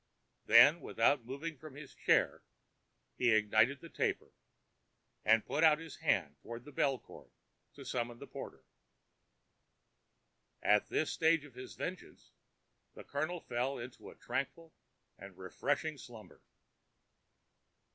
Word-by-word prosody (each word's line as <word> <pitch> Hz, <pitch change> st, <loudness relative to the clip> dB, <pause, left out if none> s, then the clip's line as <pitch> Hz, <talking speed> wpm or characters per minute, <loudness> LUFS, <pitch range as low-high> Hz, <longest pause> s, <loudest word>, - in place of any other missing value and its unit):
Then, 130 Hz, +9 st, +8 dB
without 135 Hz, -5 st, +2 dB
moving 140 Hz, +4 st, -6 dB
from 155 Hz, -1 st, -11 dB
his 145 Hz, -2 st, -10 dB
chair, -, -, +2 dB, 0.8 s
he 125 Hz, -, +3 dB
ignited 110 Hz, +6 st, +3 dB
the 165 Hz, -, -11 dB
taper, -, -, -2 dB, 0.9 s
and 110 Hz, +1 st, +4 dB
put 150 Hz, +3 st, 0 dB
out 155 Hz, -2 st, +7 dB
his 165 Hz, -2 st, -10 dB
hand -, -, 0 dB
toward 120 Hz, +1 st, -8 dB
the 145 Hz, -, -11 dB
bell 135 Hz, -1 st, +1 dB
cord, -, -, -15 dB, 0.5 s
to -, -, -11 dB
summon 120 Hz, -1 st, -3 dB
the -, -, -9 dB
porter. -, -, -9 dB, 2.0 s
At 105 Hz, 0 st, +3 dB
this 155 Hz, -, 0 dB
stage 160 Hz, -2 st, +2 dB
of 140 Hz, -, -15 dB
his 125 Hz, +1 st, -9 dB
vengeance 185 Hz, +1 st, -7 dB, 0.6 s
the -, -, -10 dB
Colonel 155 Hz, +5 st, -3 dB
fell 125 Hz, +3 st, -2 dB
into 120 Hz, +1 st, -9 dB
a -, -, -14 dB
tranquil 160 Hz, +4 st, -4 dB, 0.5 s
and 100 Hz, -2 st, -11 dB
refreshing 135 Hz, -, -2 dB
slumber. 115 Hz, -3 st, -13 dB
135 Hz, 125 wpm, -34 LUFS, 120-155 Hz, 2.0 s, Then